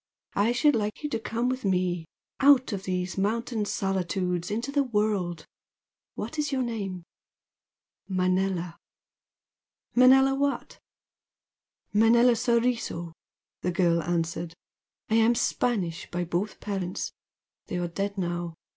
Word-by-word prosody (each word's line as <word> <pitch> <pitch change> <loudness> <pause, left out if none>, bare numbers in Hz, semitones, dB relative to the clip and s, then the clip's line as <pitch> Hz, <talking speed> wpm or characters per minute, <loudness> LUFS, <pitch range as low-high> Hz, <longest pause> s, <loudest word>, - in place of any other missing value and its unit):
I 205 +4 +2
should 290 +3 +3
like 215 +4 -2
you 295 - -1
to 230 - -1
come 230 +2 -2
with 255 +1 -2
me 180 -3 0 0.3
out 270 -4 +5
of 195 -1 -4
these 180 0 -2
mountain 220 +2 0
solitudes 180 -3 -1
into 230 +6 -2
the 285 0 +2
world! 210 - -1 0.7
What 315 - -5
is 295 -1 0
your 265 -2 +1
name?" 200 -7 -4 1.0
"Manella." 185 -2 0 1.2
"Manella 265 +2 +6
what?" 280 +1 -2 1.1
"Manella 235 +3 +5
Soriso" 230 -8 0 0.5
the 180 - 0
girl 170 -1 +2
answered 165 0 -2 0.5
"I 220 - +2
am 230 +1 +4
Spanish 195 -10 -1
by 175 0 -2
both 175 +5 -2
parents, 190 -3 -3 0.6
they 180 - -3
are 175 -1 -1
dead 200 +4 -3
now. 175 -2 -3
200 Hz, 120 wpm, -27 LUFS, 180-235 Hz, 1.2 s, Manella